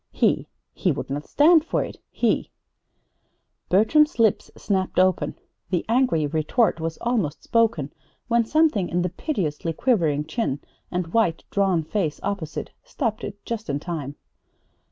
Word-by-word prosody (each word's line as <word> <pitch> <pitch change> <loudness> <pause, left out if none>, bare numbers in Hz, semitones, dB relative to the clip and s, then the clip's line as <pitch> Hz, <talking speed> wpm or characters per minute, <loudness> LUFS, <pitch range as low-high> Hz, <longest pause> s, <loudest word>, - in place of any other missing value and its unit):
He - - +1 0.3
he - - +1
would - - -4
not 145 +2 -4
stand 315 +2 +5
for - - 0
it! - - -8
He - - 0 1.2
Bertram's 300 - +4
lips 225 -4 +2
snapped 190 -2 -1
open. 185 0 +2 0.3
The 180 -3 0
angry 230 - +2
retort 160 - +1
was 165 0 -3
almost 220 -11 -1
spoken 215 -12 +1 0.3
when 235 -1 +3
something 295 - +2
in 175 0 0
the 180 - 0
piteously 165 - -2
quivering 160 - +1
chin 160 - -2 0.3
and 175 -2 -3
white, 195 -8 +2
drawn 190 -5 +2
face 160 -2 -2
opposite 195 -6 -4
stopped 240 - -3
it 205 0 -7
just 225 -5 -4
in 140 0 0
time. 145 -4 -5
190 Hz, 140 wpm, -24 LUFS, 160-230 Hz, 1.2 s, stand